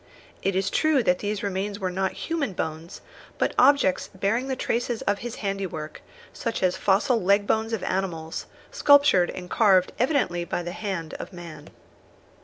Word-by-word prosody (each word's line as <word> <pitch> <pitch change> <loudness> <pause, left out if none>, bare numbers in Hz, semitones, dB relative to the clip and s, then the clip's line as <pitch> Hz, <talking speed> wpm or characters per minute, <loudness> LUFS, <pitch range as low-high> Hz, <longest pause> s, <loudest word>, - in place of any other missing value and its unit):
It 195 -1 0
is 190 0 0
true 310 -5 +2
that 180 -3 +2
these 205 -1 -3
remains 200 +1 -2
were 185 -1 -2
not 190 +1 -1
human 310 - -3
bones, 160 0 -5 0.4
but - - 0
objects 255 -9 +4
bearing 220 +7 0
the 265 - -1
traces 240 -1 -2
of 200 0 0
his 240 -1 -6
handiwork, 190 -6 -4 0.3
such 230 -4 -3
as 180 -1 +2
fossil 220 +5 +2
leg 200 +2 +3
bones 220 +2 0
of 225 -4 -2
animals, 165 -4 -3 0.2
sculptured 285 -11 +5
and 180 -1 -7
carved 190 -3 +3
evidently 250 - +1
by 175 0 -3
the 175 - -5
hand 185 -5 -4
of - - -7
man. 175 -3 -10
195 Hz, 165 wpm, -25 LUFS, 180-230 Hz, 0.4 s, sculptured